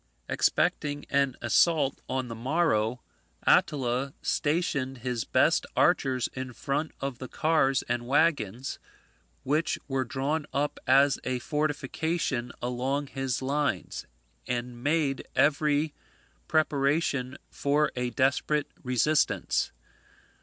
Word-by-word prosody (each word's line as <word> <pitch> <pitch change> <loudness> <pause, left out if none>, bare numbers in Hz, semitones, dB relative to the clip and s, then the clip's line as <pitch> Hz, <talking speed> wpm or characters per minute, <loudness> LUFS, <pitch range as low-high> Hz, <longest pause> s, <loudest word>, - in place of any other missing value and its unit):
Expecting 145 -1 +1
an 140 -2 +2
assault 140 +3 +3
on 130 -1 -1
the 115 - -5
morrow, 125 -3 0 0.4
Attila 135 -1 +2
stationed 145 -4 0
his 125 -4 -1
best - - +3
archers 130 -3 +3
in 130 -1 -5
front 140 +6 -2
of 135 -3 -3
the 130 - -6
cars 150 -4 +2
and 120 0 -2
waggons, 135 - +1 0.6
which 150 +4 +1
were 135 -1 0
drawn 140 +5 -2
up 145 +1 -1
as 135 +2 +5
a 130 -1 -1
fortification 150 -2 -1
along 130 +3 -1
his 135 -1 -2
lines, 145 +2 -1 0.4
and 120 0 -4
made 145 -2 0
every 150 +1 +2 0.5
preparation 140 -3 +1
for 145 +1 +1
a 125 0 -1
desperate 140 +3 +1
resistance. 130 +4 +1
135 Hz, 105 wpm, -28 LUFS, 125-150 Hz, 0.6 s, as